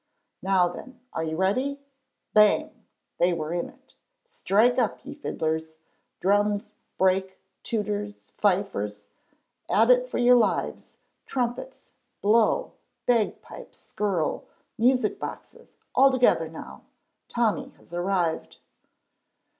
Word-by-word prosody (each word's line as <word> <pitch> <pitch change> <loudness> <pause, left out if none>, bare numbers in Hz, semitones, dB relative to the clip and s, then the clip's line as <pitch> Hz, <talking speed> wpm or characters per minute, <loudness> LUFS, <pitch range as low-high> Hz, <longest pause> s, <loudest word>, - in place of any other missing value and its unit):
Now 190 -2 +3
then, 250 +8 -9
are 160 - -2
you 160 0 -3
ready? 255 - 0 0.5
Bang! 210 -1 +3 0.3
They 175 +1 +3
were 160 -1 -3
in 175 - -2
it. - - -23 0.3
Strike 245 - +2
up, - - -1
ye - - -7
fiddlers; 160 - -2 0.5
drums, 205 +2 +1 0.3
break; 190 0 +1 0.2
tooters, 210 -2 -4
fifers, 140 - 0 0.6
at 225 +4 +5
it 250 0 +4
for - - -4
your 245 0 +6
lives; 235 - -1 0.3
trumpets, 250 - -4 0.3
blow; 225 - +3 0.3
bagpipes, 230 -4 -1
skirl; 195 -7 -2 0.3
music 250 -1 +2
boxes, - - -9 0.2
all 275 +1 +6
together 245 -11 +3
now 65 - -10 0.5
Tommy - - 0
has - - -20
arrived. 175 -2 -1
205 Hz, 105 wpm, -26 LUFS, 175-245 Hz, 0.6 s, your